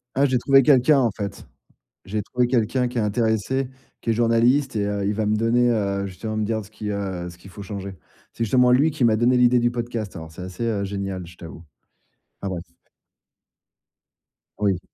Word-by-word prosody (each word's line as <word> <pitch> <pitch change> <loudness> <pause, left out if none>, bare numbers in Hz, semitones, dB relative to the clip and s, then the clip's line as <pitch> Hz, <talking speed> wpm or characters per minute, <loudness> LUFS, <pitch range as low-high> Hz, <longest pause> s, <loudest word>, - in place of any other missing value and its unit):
Ah, 140 +2 +4
j'ai 130 -2 +2
trouvé 135 +1 +5
quelqu'un 140 +1 +5
en 120 -4 +2
fait. 100 -1 -6 0.6
J'ai 105 +2 -3
trouvé 125 +4 0
quelqu'un 125 +1 +1
qui 125 - -4
est - - +3
intéressé, 110 +4 0 0.3
qui 115 - -2
est - - +4
journaliste 120 +3 +2
et 105 - +1
heu, 100 -1 -2
il 105 - 0
va 110 0 -1
me 105 +1 +2
donner, 120 +2 +3
heu, 100 -3 0
justement 110 +3 -5
me 110 - 0
dire 110 0 -2
ce 100 - -16
qui, 105 -1 -5
heu, 95 -3 -3
ce 85 - -14
qu'il 95 - -14
faut 100 - -9
changer. 100 -1 -6 0.4
C'est 115 - -2
justement 125 +3 +4
lui 140 +6 +4
qui 140 -4 -1
m'a 110 -2 +4
donné 120 +3 +3
l'idée 125 0 +5
du 120 0 +2
podcast 115 -5 -4
alors 80 -1 -8
c'est 80 +3 -10
assez, 95 +5 -5
heu, 105 -4 -1
génial, 95 -2 -4
je 85 0 -14
t'avoue, 85 0 -11 0.8
enfin, 100 - -3
bref. 85 -1 -5 1.9
Oui. 100 -3 +1
110 Hz, 205 wpm, -23 LUFS, 100-120 Hz, 1.9 s, trouvé